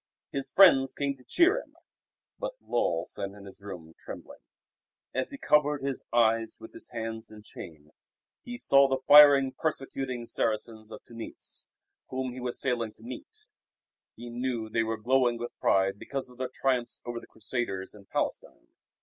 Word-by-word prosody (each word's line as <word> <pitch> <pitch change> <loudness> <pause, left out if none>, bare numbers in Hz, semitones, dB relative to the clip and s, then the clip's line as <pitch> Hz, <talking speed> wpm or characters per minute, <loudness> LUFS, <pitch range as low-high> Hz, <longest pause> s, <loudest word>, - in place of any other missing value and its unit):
His 135 -1 -3
friends 135 -9 +6
came 140 -1 -1
to 130 - -19
cheer 370 - +4
him. - - -20 0.6
But - - -4
Lull 85 -7 0
sat 100 - -5
in 100 -1 -12
his 100 0 -12
room 90 -5 -9
trembling. - - -9 0.7
As 130 - 0
he 275 - -6
covered 150 - +2
his 135 -1 -2
eyes 115 -1 +2
with 110 - -11
his - - -5
hands 115 0 -5
in 105 -1 -12
shame, 75 -7 -10 0.5
he 245 0 -7
saw 140 - +5
the 135 -1 -1
fiery, 140 -2 +9
persecuting 135 -5 -2
Saracens 110 -1 -2
of - - -9
Tunis, 115 -1 -8 0.4
whom 130 -1 -3
he 130 - -7
was 125 -1 -1
sailing 120 -4 0
to - - -19
meet. 430 - -9 0.7
He 120 0 -9
knew 120 -2 -2
they 115 - +1
were 115 0 -1
glowing 120 +1 +2
with 120 +1 -6
pride 95 +1 +2
because 135 -2 -5
of 125 - -18
their 130 -1 -2
triumphs 130 -3 0
over 120 -1 -4
the - - -15
Crusaders 105 -4 -3
in 105 -2 -15
Palestine. - - -3
120 Hz, 165 wpm, -29 LUFS, 110-135 Hz, 0.7 s, fiery